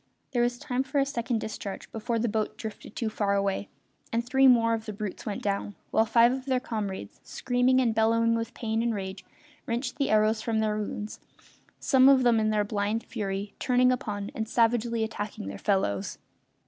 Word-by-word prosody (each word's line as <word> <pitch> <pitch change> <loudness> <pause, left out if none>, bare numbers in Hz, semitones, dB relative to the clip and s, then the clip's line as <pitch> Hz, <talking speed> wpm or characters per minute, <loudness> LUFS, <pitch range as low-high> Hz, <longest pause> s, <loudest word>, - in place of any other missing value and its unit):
There 245 -3 +1
was 240 0 +1
time 250 +1 -2
for 285 +2 -3
a 275 - +4
second 240 -4 -2
discharge 205 -2 -6
before 225 +1 -2
the 235 +1 0
boat 215 0 -2
drifted 220 -1 -8
too 230 - -2
far 205 -2 0
away, 200 0 -1 0.4
and 230 +1 0
three 265 +1 +5
more 230 -2 +5
of 225 -1 -3
the 215 - -4
brutes 205 0 -6
went 205 - -4
down, 200 0 -2 0.2
while 220 +1 +3
five 235 +2 +5
of 260 0 -4
their 260 -1 +2
comrades, 205 - -5
screaming 245 - +1
and 240 -3 +2
bellowing 230 +1 +3
with 230 +1 -3
pain 225 -1 -1
and 230 -1 0
rage, 190 -1 -5 0.4
wrenched 245 +1 -2
the 280 - 0
arrows 215 +1 +3
from 225 -1 -1
their 215 -1 +1
wounds, 210 0 -5 0.6
some 265 -2 +5
of 265 -2 +5
them 235 -2 +4
in 215 0 +1
their 210 -1 +2
blind 210 +2 -1
fury 200 -3 -4
turning 250 0 +3
upon 205 -5 -3
and 220 -1 -4
savagely 235 -1 +2
attacking 210 - -5
their 100 0 -6
fellows. 100 - 0
225 Hz, 195 wpm, -28 LUFS, 210-245 Hz, 0.6 s, three